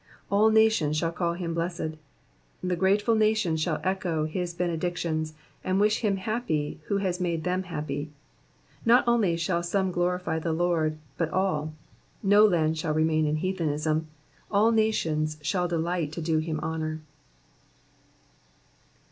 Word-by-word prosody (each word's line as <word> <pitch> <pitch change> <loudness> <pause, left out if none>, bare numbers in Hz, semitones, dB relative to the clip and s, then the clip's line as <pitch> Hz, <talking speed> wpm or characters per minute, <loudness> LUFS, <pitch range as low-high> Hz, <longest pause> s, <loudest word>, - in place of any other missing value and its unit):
^^All 210 +2 +5
nations 220 -9 +3
shall 165 +1 0
call 170 0 -1
him 170 -1 -4
hlessed."*^ 170 -1 -3 0.7
The 180 -1 0
grateful 200 +5 +2
nations 215 -7 +2
shall 155 -1 0
echo 180 -4 0
his 175 +2 -3
benedictions, 170 -2 -2 0.3
and 185 +1 +1
wish 210 +1 +3
him 205 -4 +1
happy 190 -9 -2
who 200 - +1
has 185 -2 -1
made 170 -3 -1
them 180 +1 0
happy. 150 -4 -4 0.7
Not 240 +2 +5
only 215 -8 +3
shall 170 +1 0
some 190 +2 0
glorify 175 -2 -1
the 160 0 -1
Lord, 160 -2 +1 0.2
but 165 -2 +1
all; 155 -5 -1 0.5
no 205 +1 +6
land 160 -4 +1
shall 155 -1 -1
remain 155 0 +2
in 150 - +1
heathenism; 155 -3 -1 0.4
all 215 +3 +4
nations 160 -9 +1
shall 180 +3 0
delight 170 -2 -1
to 170 - -4
do 160 -1 +1
him 155 -1 -2
honour. 155 -1 -3
170 Hz, 140 wpm, -27 LUFS, 155-190 Hz, 0.7 s, no